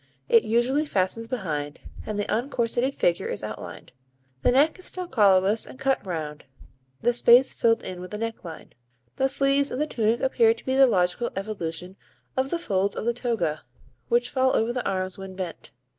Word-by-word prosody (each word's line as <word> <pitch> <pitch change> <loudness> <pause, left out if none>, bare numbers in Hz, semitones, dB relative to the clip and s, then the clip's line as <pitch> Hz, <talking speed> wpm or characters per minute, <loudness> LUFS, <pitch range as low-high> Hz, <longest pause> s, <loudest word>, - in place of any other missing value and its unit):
It 230 - +6
usually 240 +7 +1
fastens 200 +1 -1
behind, 150 - -4 0.3
and 215 -1 -3
the 205 - -1
uncorseted 240 +2 -1
figure 170 0 +1
is 105 - -4
outlined. 105 0 -8 0.5
The - - +3
neck 290 +8 +3
is 370 - -11
still 365 -1 -4
collarless 205 - +3
and - - -11
cut 270 0 0
round, 155 -4 -5 0.6
the 240 +1 +3
space 240 +2 +6
filled 230 0 +2
in 180 -1 -6
with 180 - -9
a - - -3
necklace. 220 -7 -6 0.5
The 270 - +2
sleeves 275 +1 +2
of - - -3
the 300 - +1
tunic 230 -4 0
appear 235 -4 +3
to 230 - -15
be 260 - 0
the 270 0 +7
logical 185 +2 +1
evolution 185 -2 -5 0.4
of 260 +1 0
the 345 - -1
folds 200 - -1
of - - -4
the 235 - +2
toga, 230 -11 -2 0.5
which 475 +1 +1
fall 260 0 +2
over 230 +2 +1
the 250 - -2
arms 185 0 -3
when 190 -1 -8
bent. 185 -3 -6
230 Hz, 185 wpm, -25 LUFS, 185-260 Hz, 0.6 s, the